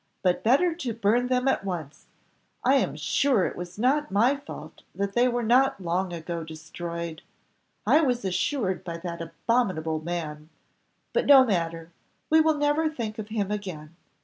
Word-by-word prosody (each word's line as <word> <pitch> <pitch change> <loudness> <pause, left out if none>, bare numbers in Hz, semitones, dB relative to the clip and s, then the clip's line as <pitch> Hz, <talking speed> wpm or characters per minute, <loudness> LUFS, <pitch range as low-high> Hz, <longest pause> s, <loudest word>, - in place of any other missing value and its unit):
But 180 -1 +2
better 285 +10 +4
to 260 -9 -4
burn 230 +3 +2
them 250 +1 +1
at 270 - +1
once; 170 -7 -6 0.6
I - - +5
am - - 0
sure 260 -9 +2
it - - -3
was 175 +1 -8
not 275 +6 +2
my 235 +8 +3
fault 280 0 -10
that 200 0 -2
they 240 +3 +4
were 240 -1 -1
not 250 +1 +3
long 180 +1 -1
ago 170 0 -5
destroyed. 170 +1 -6 0.6
I 310 - +5
was 245 -7 0
assured 190 +1 -1
by 170 -2 -5
that 170 0 -6
abominable 165 -3 -1
man 155 -3 -5 0.6
but - - +1
no 270 -2 +9
matter, 165 -5 -2 0.4
we 320 0 +7
will 315 -1 +2
never 295 +2 +2
think 225 -7 -5
of 210 - -5
him 210 -2 -2
again. 175 -7 -6
200 Hz, 165 wpm, -26 LUFS, 170-255 Hz, 0.6 s, no